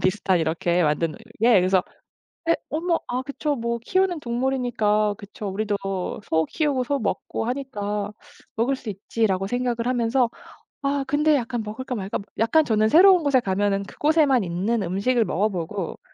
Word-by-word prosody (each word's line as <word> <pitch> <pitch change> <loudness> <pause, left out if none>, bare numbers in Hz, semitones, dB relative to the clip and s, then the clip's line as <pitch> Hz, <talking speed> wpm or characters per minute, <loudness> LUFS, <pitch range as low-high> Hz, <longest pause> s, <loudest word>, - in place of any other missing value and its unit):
비슷한 185 -1 +1
이렇게 170 +2 +1
만든 155 +1 +1 0.3
예 240 +1 +6
그래서 185 0 +2 0.7
'에 335 - +5
어머 335 +2 0
아 250 +1 -2
그쵸. 285 +2 -2
뭐 235 -1 -2
키우는 365 +7 +1
동물이니까 235 -5 0
그쵸. 205 0 -8
우리도 205 +1 -1 0.5
소 160 0 +2
키우고 285 -5 0
소 280 +3 -1
먹고 220 0 -2
하니까 210 -6 -3 0.5
먹을 245 +5 +1
수 250 -4 -8
있지.' 210 +3 -1
라고 190 0 -1
생각을 245 0 -1
하면서 245 0 +2 0.5
아 280 0 0
근데 300 +2 +3
약간 240 -3 -2
'먹을까? 250 +5 -5
말까?' 200 -4 -3
뭐 200 - -10
약간 300 +8 +4
저는 215 -3 +2
새로운 365 - +7
곳에 280 -3 +4
가면은 200 0 0
그곳에만 290 +1 +2
있는 195 +6 -1
음식을 200 +7 +1
먹어 205 +4 +1
보고 180 -1 -4
230 Hz, 340 characters per minute, -24 LUFS, 200-265 Hz, 0.7 s, 새로운